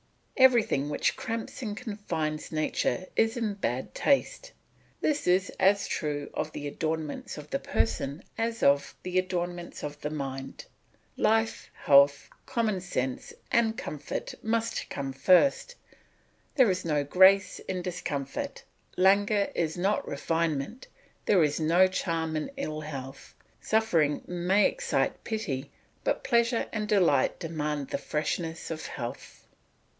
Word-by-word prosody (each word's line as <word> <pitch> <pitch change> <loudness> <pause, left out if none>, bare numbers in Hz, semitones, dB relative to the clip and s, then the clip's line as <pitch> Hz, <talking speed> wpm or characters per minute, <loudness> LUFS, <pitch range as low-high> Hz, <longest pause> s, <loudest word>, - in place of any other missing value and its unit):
Everything 235 - +4
which 150 - 0
cramps 230 +2 -5
and 210 -4 -4
confines 170 -10 -3
nature 155 +3 0
is 225 +1 +2
in 220 -3 -1
bad 130 - -3
taste; 285 - +1 0.5
this 295 -8 0
is 185 +2 +3
as 200 +1 +4
true 145 -2 -3
of 155 - -3
the 145 - -6
adornments 155 0 -3
of - - -10
the - - 0
person 140 +7 -1 0.2
as 230 0 -1
of 140 0 +3
the 185 0 +1
ornaments 175 -1 -4
of 145 0 -6
the 150 - -2
mind. 135 -3 -5 0.5
Life, 225 +1 +1 0.2
health, 140 0 +6 0.2
common 225 -7 0
sense, 130 -8 -3 0.2
and 225 -2 +2
comfort 150 -1 -5
must 230 +1 -1
come 135 -1 -4
first; 190 - +3 0.8
there 255 -8 +5
is 185 - -2
no 150 -3 +1
grace 190 +5 +5
in 185 -1 -4
discomfort, 150 -6 -4 0.3
languor 200 +2 +4
is 160 0 -1
not 195 +4 0
refinement, 165 - -2 0.4
there 185 -5 +5
is 150 0 +1
no 165 +4 +5
charm 165 -4 -1
in 155 - -2
ill 155 - -3
health; 135 -3 -8 0.3
suffering 170 -10 +2
may 180 +3 +2
excite - - 0
pity, 155 - -3 0.3
but - - 0
pleasure 235 -1 +2
and 210 -1 -2
delight 175 -10 +3
demand 150 -4 -3
the - - -2
freshness 160 +3 -3
of 160 -1 -5
health. 120 -1 -7
175 Hz, 130 wpm, -28 LUFS, 150-215 Hz, 0.8 s, health